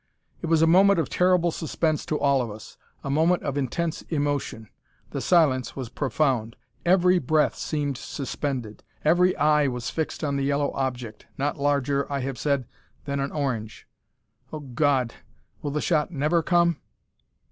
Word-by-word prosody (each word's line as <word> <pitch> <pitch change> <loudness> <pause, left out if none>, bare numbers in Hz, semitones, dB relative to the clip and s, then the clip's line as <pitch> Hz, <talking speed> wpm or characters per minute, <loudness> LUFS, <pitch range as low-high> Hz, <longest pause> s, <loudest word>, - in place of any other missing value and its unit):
It 170 - -3
was 165 0 +3
a - - +7
moment 195 +4 +5
of 165 - -1
terrible 180 -1 +3
suspense 160 -1 -1
to 150 - -1
all 140 -2 +3
of 120 - -3
us 105 +1 -10 0.3
a 135 - -3
moment 165 +5 +2
of 140 -2 -2
intense 155 +4 -2
emotion. 145 -7 -2 0.4
The - - -3
silence 130 -8 +2
was 130 -4 -5
profound. 130 -5 0 0.3
Every 180 0 +4
breath 155 +2 +2
seemed 145 -4 -3
suspended; 130 -5 -4 0.2
every 180 +4 +4
eye 150 -1 +3
was 125 -2 -3
fixed 160 -1 -3
on 140 -2 0
the 140 - -1
yellow 140 +1 +1
object, 125 -5 -4
not 145 +1 -1
larger, 140 0 0
I 140 -1 -1
have 130 0 -4
said, 140 -3 0 0.4
than 140 -1 -2
an 135 +1 -2
orange. 120 -8 -3 0.6
Oh, 155 - -6
God! 130 -2 0 0.5
will 145 - -3
the 150 +1 -2
shot 155 -4 +1
never 160 +1 +1
come? 170 -1 +2
145 Hz, 160 wpm, -25 LUFS, 135-160 Hz, 0.6 s, a